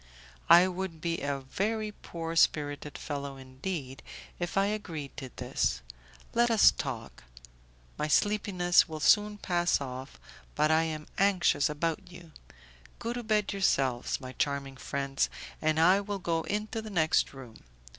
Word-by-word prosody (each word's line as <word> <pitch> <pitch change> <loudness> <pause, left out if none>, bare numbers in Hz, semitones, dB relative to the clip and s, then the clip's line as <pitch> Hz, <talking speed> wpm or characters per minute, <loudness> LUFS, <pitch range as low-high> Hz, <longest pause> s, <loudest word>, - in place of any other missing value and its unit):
"I 175 +2 +8
would 185 -2 -4
be 170 +1 -2
a 140 -1 -2
very 215 +10 -2
poor 165 -5 -6
spirited 145 -2 +1
fellow 140 -2 -5
indeed, 130 +1 -6 0.4
if 175 +2 -3
I 195 - +4
agreed 175 -9 -4
to 135 -2 -6
this; - - -1 0.5
let 240 +1 +3
us 225 -2 +7
talk; - - -6 0.8
my 150 - 0
sleepiness 180 0 +3
will 155 -1 -5
soon 210 +5 +4
pass 175 -3 +1
off, 130 - -7 0.4
but 155 - +3
I 160 +1 +4
am 155 -1 -4
anxious 185 -7 +3
about 165 +5 -3
you. 175 -2 -13 0.7
Go 235 - -3
to 245 - -4
bed 215 -3 0
yourselves, 135 -10 +1
my 130 -2 -8
charming 140 0 -2
friends, 140 0 -1 0.3
and 155 0 +2
I 185 +5 +5
will 205 0 -4
go 170 -3 -1
into 215 +2 -2
the 220 - -8
next 160 -5 +2
room. 130 -5 -12
165 Hz, 145 wpm, -29 LUFS, 140-195 Hz, 0.8 s, I